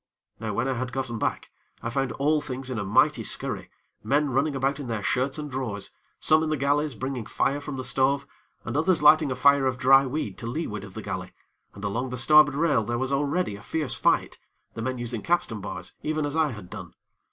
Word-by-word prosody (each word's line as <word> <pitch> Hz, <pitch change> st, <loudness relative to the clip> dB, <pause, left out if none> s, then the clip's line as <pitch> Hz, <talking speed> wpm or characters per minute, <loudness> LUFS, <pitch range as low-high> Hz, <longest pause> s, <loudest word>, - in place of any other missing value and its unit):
Now 110 Hz, -2 st, -3 dB
when 120 Hz, +3 st, 0 dB
I 135 Hz, -, +1 dB
had 125 Hz, 0 st, -3 dB
gotten 125 Hz, -4 st, -3 dB
back, -, -, -2 dB, 0.3 s
I 115 Hz, -, -2 dB
found 135 Hz, -1 st, -1 dB
all 150 Hz, +2 st, +1 dB
things 130 Hz, -2 st, -4 dB
in 120 Hz, -, -2 dB
a -, -, -2 dB
mighty 100 Hz, +1 st, +3 dB
scurry -, -, -1 dB, 0.3 s
men 145 Hz, 0 st, +1 dB
running 140 Hz, +3 st, +1 dB
about 135 Hz, +2 st, 0 dB
in 140 Hz, -, -6 dB
their 110 Hz, -3 st, -3 dB
shirts 130 Hz, +6 st, 0 dB
and 150 Hz, -1 st, -4 dB
drawers, 120 Hz, -6 st, -4 dB, 0.3 s
some 155 Hz, 0 st, +4 dB
in 160 Hz, -, -1 dB
the 155 Hz, -, 0 dB
galley 145 Hz, +3 st, +1 dB
bringing 130 Hz, -1 st, -4 dB
fire 140 Hz, +1 st, 0 dB
from 145 Hz, -2 st, -6 dB
the 130 Hz, -, -4 dB
stove, 135 Hz, +2 st, +1 dB, 0.4 s
and -, -, -4 dB
others 160 Hz, +2 st, +2 dB
lighting 150 Hz, -1 st, +6 dB
a -, -, -1 dB
fire 140 Hz, +1 st, +4 dB
of 130 Hz, -1 st, -1 dB
dry 135 Hz, +1 st, +6 dB
weed 125 Hz, -7 st, -4 dB
to 115 Hz, -, -5 dB
leeward 115 Hz, -6 st, -4 dB
of 95 Hz, -2 st, -11 dB
the -, -, -6 dB
galley, -, -, -5 dB, 0.4 s
and 100 Hz, -, -10 dB
along 115 Hz, +6 st, -2 dB
the 125 Hz, -, -4 dB
starboard 150 Hz, +2 st, +6 dB
rail 145 Hz, -6 st, +2 dB
there 120 Hz, +2 st, -2 dB
was 130 Hz, +2 st, -1 dB
already 145 Hz, -, 0 dB
a 100 Hz, -, -11 dB
fierce 150 Hz, +5 st, -1 dB
fight, -, -, +1 dB, 0.3 s
the 115 Hz, -, -6 dB
men 130 Hz, +2 st, -2 dB
using 120 Hz, -2 st, -4 dB
capstan 170 Hz, -, 0 dB
bars, 105 Hz, -, -6 dB
even 155 Hz, -1 st, -1 dB
as 145 Hz, +1 st, -3 dB
I 160 Hz, -2 st, +3 dB
had 105 Hz, -8 st, -9 dB
done. -, -, -9 dB
135 Hz, 225 wpm, -26 LUFS, 120-145 Hz, 0.4 s, lighting